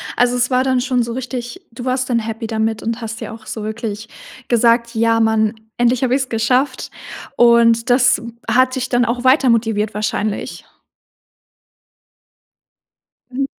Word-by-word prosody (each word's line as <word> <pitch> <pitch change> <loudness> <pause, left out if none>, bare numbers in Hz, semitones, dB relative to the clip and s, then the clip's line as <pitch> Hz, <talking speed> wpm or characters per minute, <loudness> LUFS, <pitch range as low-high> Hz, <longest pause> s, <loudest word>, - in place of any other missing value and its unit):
Also, 245 0 +2
es 245 +1 +1
war 255 0 +2
dann 260 -2 +1
schon 250 -2 0
so 230 0 -5
richtig 255 +6 -6
du 240 +2 -9
warst 255 0 -1
dann 235 -1 +2
happy 225 0 -5
damit 220 0 -2
und 230 +1 -3
hast 225 0 -6
dir - - -6
auch 220 -1 -12
so 220 - -6
wirklich 220 0 -5 0.4
gesagt: 235 0 +2
„Ja, 230 0 +2
mann, 220 0 +2 0.2
endlich 240 +1 +2
habe 255 0 +2
ich's 265 -1 -2
geschafft." 250 +4 0 0.4
Und, 235 0 +4
das 245 0 +4 0.3
hat 255 +3 +3
dich 260 0 -3
dann 245 -1 +2
auch 240 +2 -2
weiter 260 0 +4
motiviert 220 -2 +1
wahrscheinlich? 210 0 -3 2.7
Hm. 275 +1 -1
235 Hz, 155 wpm, -18 LUFS, 225-255 Hz, 2.7 s, Und